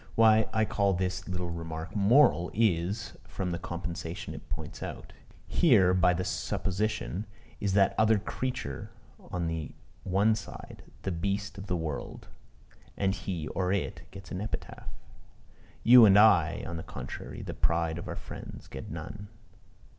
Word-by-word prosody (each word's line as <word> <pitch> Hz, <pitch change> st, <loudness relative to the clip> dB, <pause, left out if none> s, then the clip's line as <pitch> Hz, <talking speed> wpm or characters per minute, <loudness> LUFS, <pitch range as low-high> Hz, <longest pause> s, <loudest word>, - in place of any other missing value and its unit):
Why 110 Hz, -1 st, +5 dB
I 110 Hz, 0 st, +2 dB
call 100 Hz, -2 st, +1 dB
this 95 Hz, 0 st, -2 dB
little 90 Hz, -1 st, -3 dB
remark 80 Hz, +1 st, -6 dB
moral, 105 Hz, -3 st, +5 dB
is, 100 Hz, -1 st, +1 dB
from 90 Hz, -2 st, -3 dB
the 85 Hz, -, -2 dB
compensation 85 Hz, +2 st, -5 dB
it -, -, -11 dB
points -, -, -6 dB
out. -, -, -7 dB, 0.3 s
Here, 105 Hz, -, +4 dB
by 90 Hz, -1 st, +4 dB
the 90 Hz, -, -1 dB
supposition, 105 Hz, +2 st, -2 dB, 0.3 s
is 100 Hz, -2 st, 0 dB
that 100 Hz, -1 st, +4 dB
other 110 Hz, 0 st, +5 dB
creature 125 Hz, -, -4 dB, 0.4 s
on 90 Hz, -1 st, -2 dB
the 80 Hz, -2 st, -4 dB, 0.3 s
one 100 Hz, +4 st, +3 dB
side, 110 Hz, -2 st, -8 dB, 0.2 s
the 95 Hz, -, -1 dB
beast 100 Hz, +3 st, -2 dB
of 100 Hz, -, -8 dB
the 90 Hz, -, 0 dB
world; 80 Hz, -3 st, -5 dB, 0.7 s
and 95 Hz, -1 st, +1 dB
he 85 Hz, -6 st, -4 dB
(or 90 Hz, -1 st, -1 dB
it) 95 Hz, -5 st, -1 dB
gets 95 Hz, -2 st, -12 dB
an 90 Hz, -, -3 dB
epitaph. 110 Hz, -, -6 dB, 1.0 s
You 120 Hz, -1 st, +9 dB
and 100 Hz, 0 st, +7 dB
I, 90 Hz, -7 st, +5 dB
on 85 Hz, 0 st, -4 dB
the -, -, -4 dB
contrary, -, -, -7 dB
the -, -, -5 dB
pride 85 Hz, 0 st, 0 dB
of -, -, -7 dB
our -, -, -4 dB
friends, -, -, -9 dB
get 65 Hz, -, -8 dB
none. 100 Hz, +6 st, -7 dB
95 Hz, 155 wpm, -29 LUFS, 85-105 Hz, 1.0 s, You